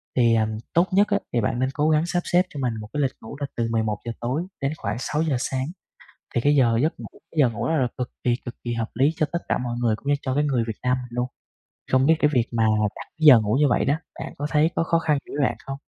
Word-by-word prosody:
thì, 115 -2 +4
ờm, 110 -1 0 0.2
tốt 170 +3 +4
nhất 200 +2 +4
á, 200 -1 +1
thì 120 - +2
bạn 115 +3 -1
nên 130 +1 +1
cố 150 +2 +1
gắng 155 +1 +3
sắp 175 0 0
xếp 175 - +4
cho 145 - -8
mình 125 -3 0
một 105 - -8
cái 145 - 0
lịch 135 -1 +1
ngủ 110 - -9
là 140 - -2
từ 115 -1 0
11:00 110 0 -1
tối 130 +7 -1 0.2
đến 135 +2 0
khoảng 100 0 -3
6:00 150 +2 0
sáng, 130 0 -2 0.7
thì - - +2
cái 145 +4 +3
giờ 120 -4 +4
giấc 155 - -1
ngủ - - -7 0.3
cái 160 - -7
giờ 130 -4 +5
ngủ 115 - -3
đó 160 - +1
là 130 -4 +2
cực 125 -1 -3
kỳ, 120 - +3
cực 120 - -6
kỳ 120 -1 -2
hợp 115 -1 -3
lý 135 +5 +3
cho 155 - +1
tất 170 - +1
cả - - +1
mọi 120 -1 -3
người 115 -3 +2
cũng 140 - -9
như 145 - +4
cho 130 - -1
cái 145 +2 +2
người 130 -5 +1
Việt 110 -3 -5
Nam 125 0 +2
mình 125 - -9
luôn. 125 +1 -1 0.7
Không 130 +1 +4
biết 160 +2 +5
cái 150 - +3
việc 120 -2 +3
mà 115 -1 +2 0.3
đặt - - -9
giờ 145 -7 +8
ngủ 110 +2 0
như 150 - +5
vậy - - +2
đó, 140 - +2 0.3
bạn - - -5
có 145 - -2
thấy 155 +1 +3
có - - +2
khó 165 0 +2
khăn 155 -3 +1
gì - - -13
với 145 - +1
bạn - - -5
không? 135 0 -5
130 Hz, 290 wpm, -24 LUFS, 120-150 Hz, 0.7 s, giờ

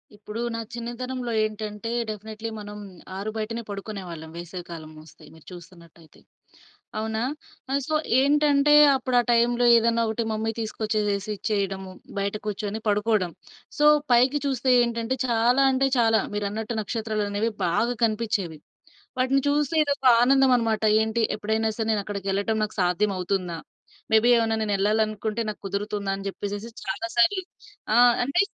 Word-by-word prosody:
ఇప్పుడూ 210 +2 -7
నా 230 - -3
చిన్నతనంలో 240 +1 -5
ఏంటంటే, 215 +1 -4 0.2
డెఫినెట్లీ 215 +1 -6
మనం 205 0 -8 0.4
ఆరు 200 +2 -4
బయటనే 230 +2 -3
పడుకునే 200 0 -6
వాళ్ళం, 160 -1 -8
వేసవి 175 +1 -7
కాలమొస్తే, 155 -1 -11
మీరు 160 -1 -18
చూస్తున్నట్టయితే. 170 -2 -15 0.8
అవునా! 220 0 -2 0.5
ఆహ్, 280 +1 +1
సో, 310 - 0 0.3
ఏంటంటే, 290 0 +3 0.2
అప్పుడా 255 -1 +1
టైంలో 240 +1 +3
ఏదైనా 230 0 +2
ఒకటి 220 +1 -1
మమ్మీ 220 +1 -1
తీసుకొచ్చేసేసి 215 -2 -2
ఇచ్చేయడము, 195 -2 -2 0.3
బయట 200 0 -1
కూర్చొని 210 +1 -3
పడుకోడం. 205 -3 +1 0.5
సో, 295 - +3 0.3
పైకి 255 +4 +4
చూస్తే 265 -1 -1
ఏంటంటే, 235 +1 -2
చాలా 240 +3 +3
అంటే, 270 +1 +2
చాలా 225 -1 +4 0.2
మీరన్నట్టు 210 +3 -3
నక్షత్రాలనేవి 215 0 -2
బాగా 230 +8 +1
కనిపిచ్చేవి. 210 -7 -2 0.6
వాటిని 260 +2 +2
చూస్తే 295 +2 0
ఇదొక 285 -2 -2 0.2
ఆనందం 270 +1 +4
అనమాట, 225 -2 -1 0.2
ఏంటి, 220 +1 -1
ఎప్పుడైనా 220 +1 0
సరే 225 -1 -1
నేనక్కడికెళ్ళటం 200 +1 -1
నాకు 215 - -7
సాధ్యం 180 +4 +1
అవుతుందా! 180 -2 -2 0.5
మేబీ 220 +2 +5
ఏవన్న 225 -1 +1
నేనెళ్ళాలనుకుంటే, 215 +2 0
నాకు 210 - -9
కుదురుతుందా! 200 0 -3
అని 195 0 -8
జెప్పేసేసి 205 +3 -5 0.2
చాలా 210 +4 -3
సార్లు. 375 +9 +3 0.5
ఆ! - - +4 0.3
అంటే 280 +9 +2
220 Hz, 130 wpm, -25 LUFS, 200-235 Hz, 0.8 s, మేబీ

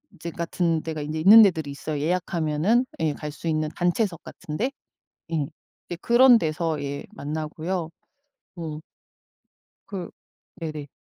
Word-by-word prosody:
이제 170 +2 -6
같은 170 -1 -1
데가 160 -2 -4
이제 155 +2 -3
있는 205 +8 +9
데들이 160 -8 +3
있어요. 145 +1 -4
예약하면은 175 - +1 0.2
예 155 -2 +1
갈 150 +1 -6
수 155 +3 -8
있는 155 -1 0
단체석 175 0 0
같은데? 185 - -4 0.6
예. 155 -3 0 0.4
이제 175 - -5
그런 245 0 +7
데서 160 -2 -1
예 140 0 -4
만나고요. 160 +3 -4 0.7
어. 155 -2 -5 1.1
그 185 -4 -6 0.5
네네. 155 -3 -5
160 Hz, 260 characters per minute, -25 LUFS, 155-180 Hz, 1.1 s, 있는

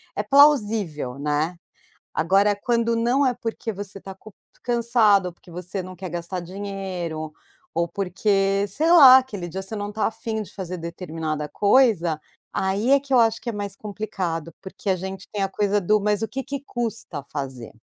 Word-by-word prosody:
É - - 0
plausível, 215 - +3
né? 150 +4 -1 0.6
Agora 195 +5 +3
quando 235 +2 0
não 245 +5 +2
é 250 - +1
porque 225 -1 -4
você 200 0 -7
está 195 0 -9
culp 210 +1 -15 0.3
cansado, 235 -5 +3
ou 175 - -7
porque 175 - -18
você 180 +2 -5
não 185 0 -9
quer 185 -1 -6
gastar 175 +2 -4
dinheiro, 180 -4 -5 0.4
ou 170 +1 0
porque 195 +1 +1
sei 315 - 0
lá, 270 -7 +10
aquele 205 -10 -3
dia 190 +3 -5
você 195 +3 -7
não 205 0 -4
tá 215 +1 0
a - - -3
fim 220 0 -4
de 210 - -10
fazer 185 -2 -5
determinada 160 -3 -4
coisa, 200 -8 +3 0.3
aí 200 +7 0
é 280 - +6
que 280 -1 -4
eu 250 - +6
acho 225 0 +3
que 240 - -4
é - - -3
mais 200 -1 -4
complicado, 185 -6 -4
porque 195 +1 -6
a 190 - +3
gente 190 +1 -7
tem 205 -2 -3
a 195 - 0
coisa 205 0 +1
do 210 +4 +3
"Mas 210 +1 0
o 225 - -1
que 270 - -4
que 280 -1 -5
custa 230 - -4
fazer?" 130 -5 -6
200 Hz, 185 wpm, -23 LUFS, 175-225 Hz, 0.6 s, lá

